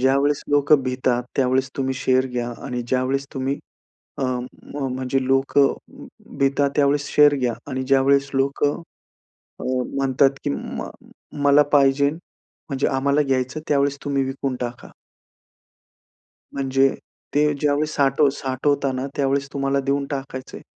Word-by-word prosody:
ज्यावेळेस 140 Hz, +2 st, +2 dB
लोकं 145 Hz, -1 st, +4 dB
भितात 125 Hz, -1 st, 0 dB
त्यावेळेस 130 Hz, 0 st, +1 dB
तुम्ही 130 Hz, -1 st, -1 dB
शेअर 130 Hz, 0 st, +1 dB
घ्या 120 Hz, -1 st, -3 dB
आणि 125 Hz, -1 st, -3 dB
ज्यावेळेस 130 Hz, +2 st, 0 dB
तुम्ही 135 Hz, +1 st, -2 dB, 0.6 s
अ, 135 Hz, -, 0 dB, 0.5 s
म्हणजे 130 Hz, -1 st, -2 dB
लोकं 135 Hz, +1 st, +3 dB, 0.6 s
भितात 140 Hz, +1 st, +2 dB
त्यावेळेस 145 Hz, 0 st, +2 dB
शेअर 145 Hz, -1 st, +6 dB
घ्या 125 Hz, -2 st, 0 dB, 0.2 s
आणि 130 Hz, 0 st, -2 dB
ज्यावेळेस 140 Hz, +1 st, +3 dB
लोकं 140 Hz, +3 st, +1 dB, 0.8 s
अ, -, -, -6 dB, 0.3 s
म्हणतात, 135 Hz, 0 st, +3 dB
की -, -, 0 dB
म 70 Hz, -, -5 dB, 0.6 s
मला 145 Hz, +1 st, +6 dB
पाहिजेन 140 Hz, +1 st, +4 dB, 0.5 s
म्हणजे 140 Hz, -2 st, 0 dB
आम्हाला 140 Hz, +2 st, +2 dB
घ्यायचं 130 Hz, +1 st, -1 dB
त्यावेळेस 140 Hz, -1 st, +2 dB
तुम्ही 140 Hz, -2 st, 0 dB
विकून 135 Hz, -1 st, -3 dB
टाका. 120 Hz, 0 st, -6 dB, 1.6 s
म्हणजे 135 Hz, 0 st, +2 dB, 0.5 s
ते 150 Hz, 0 st, +3 dB
ज्यावेळेस 150 Hz, +1 st, +1 dB
साठव 140 Hz, +1 st, +3 dB
साठवता 135 Hz, +1 st, 0 dB
ना 130 Hz, +1 st, -3 dB
त्यावेळेस 140 Hz, 0 st, 0 dB
तुम्हाला 140 Hz, 0 st, 0 dB
देऊन 140 Hz, 0 st, 0 dB
टाकायचं 135 Hz, -1 st, -6 dB
आहे. -, -, -14 dB
135 Hz, 125 wpm, -22 LUFS, 130-140 Hz, 1.6 s, शेअर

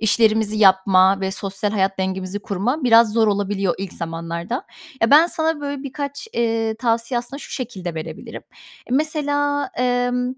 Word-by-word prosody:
işlerimizi 220 Hz, -1 st, +2 dB
yapma 190 Hz, -1 st, +5 dB
ve 190 Hz, 0 st, -1 dB
sosyal 195 Hz, +1 st, -3 dB
hayat 195 Hz, -2 st, 0 dB
dengemizi 190 Hz, +1 st, -3 dB
kurma 210 Hz, -, -2 dB
biraz 230 Hz, -2 st, +6 dB
zor 225 Hz, -1 st, +3 dB
olabiliyor 200 Hz, -2 st, 0 dB
ilk 195 Hz, -2 st, -5 dB
zamanlarda. 170 Hz, +6 st, -5 dB, 0.4 s
Ya, 225 Hz, -, +3 dB
ben 310 Hz, +4 st, +7 dB
sana, 320 Hz, -2 st, -1 dB
böyle, 285 Hz, -1 st, -4 dB
birkaç, 285 Hz, -, -6 dB
eee, 225 Hz, -1 st, 0 dB
tavsiye 235 Hz, +1 st, 0 dB
aslında 260 Hz, +3 st, -6 dB
şu -, -, -10 dB
şekilde 195 Hz, -, -5 dB
verebilirim. 160 Hz, -1 st, -7 dB, 0.5 s
Mesela, 290 Hz, 0 st, 0 dB
emm, 250 Hz, 0 st, 0 dB
225 Hz, 145 wpm, -21 LUFS, 195-260 Hz, 0.5 s, ben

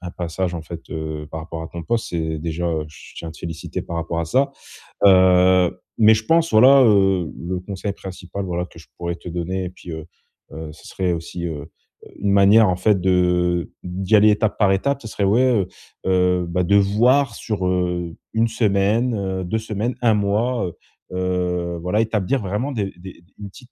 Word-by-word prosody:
un 90 Hz, 0 st, -6 dB
passage 90 Hz, +1 st, -3 dB
en 80 Hz, -, -5 dB
fait, 85 Hz, +1 st, -8 dB
heu 80 Hz, -2 st, -5 dB
par 80 Hz, -, -5 dB
rapport 80 Hz, 0 st, -7 dB
à 80 Hz, -, -7 dB
ton 85 Hz, -1 st, -7 dB
poste 115 Hz, +1 st, -2 dB
et 80 Hz, -2 st, -2 dB
déjà, 85 Hz, +2 st, -3 dB
heu, 80 Hz, -2 st, -1 dB
je 75 Hz, -, -15 dB
tiens 85 Hz, -, -6 dB
à -, -, -7 dB
te -, -, -15 dB
féliciter 85 Hz, +2 st, -5 dB
par 85 Hz, -, -6 dB
rapport 85 Hz, 0 st, -2 dB
à -, -, -1 dB
ça. 135 Hz, -, +1 dB, 0.6 s
Heu 90 Hz, -1 st, +5 dB, 0.2 s
mais 110 Hz, 0 st, +7 dB
je 110 Hz, -, -4 dB
pense, 165 Hz, +3 st, +2 dB
voilà, 130 Hz, +5 st, +7 dB
heu, 95 Hz, -6 st, +3 dB
le 90 Hz, +1 st, -4 dB
conseil 100 Hz, +1 st, -5 dB
principal, 95 Hz, 0 st, -7 dB
voilà, 90 Hz, 0 st, -2 dB
que 80 Hz, -, -15 dB
je -, -, -16 dB
pourrais 85 Hz, 0 st, -3 dB
te 90 Hz, -, -10 dB
donner 90 Hz, +2 st, -3 dB
et -, -, -4 dB
puis, 90 Hz, -2 st, -11 dB
heu 80 Hz, -1 st, -6 dB, 0.5 s
heu, 80 Hz, 0 st, -7 dB
ce -, -, -17 dB
serait 90 Hz, -2 st, -1 dB
aussi 85 Hz, +1 st, -5 dB
heu 80 Hz, -1 st, -6 dB, 0.5 s
une 100 Hz, 0 st, 0 dB
manière 100 Hz, +2 st, +6 dB
en 90 Hz, -, +1 dB
fait, 100 Hz, +1 st, +2 dB
de 90 Hz, -1 st, +1 dB
d'y 95 Hz, +4 st, 0 dB
aller 105 Hz, +1 st, +6 dB
étape 105 Hz, 0 st, 0 dB
par 100 Hz, -3 st, +3 dB
étape, 140 Hz, +9 st, 0 dB
ce 110 Hz, -, -8 dB
serait 105 Hz, -, -3 dB
ouais, 110 Hz, +6 st, +3 dB
heu 110 Hz, -8 st, +2 dB, 0.4 s
heu, 90 Hz, -1 st, +2 dB
bah 90 Hz, +1 st, 0 dB
de 100 Hz, +4 st, +2 dB
voir 115 Hz, +5 st, +3 dB
sur, 100 Hz, -5 st, -3 dB
heu, 90 Hz, -2 st, -1 dB, 0.2 s
1 115 Hz, +1 st, +2 dB
semaine, 110 Hz, +2 st, +1 dB
heu 95 Hz, -2 st, -3 dB
2 110 Hz, +5 st, -1 dB
semaines, 110 Hz, +3 st, -3 dB
1 115 Hz, -3 st, +4 dB
mois, 105 Hz, +4 st, 0 dB
heu 85 Hz, -, -7 dB, 0.4 s
heu, 90 Hz, -1 st, -1 dB
voilà. 90 Hz, +5 st, 0 dB
Établir 110 Hz, +2 st, 0 dB
vraiment 105 Hz, +9 st, -2 dB
des 105 Hz, -6 st, -1 dB
des 95 Hz, 0 st, -10 dB
des -, -, -26 dB
une 100 Hz, -1 st, -8 dB
petite 125 Hz, +5 st, -16 dB
95 Hz, 210 wpm, -21 LUFS, 85-105 Hz, 0.6 s, mais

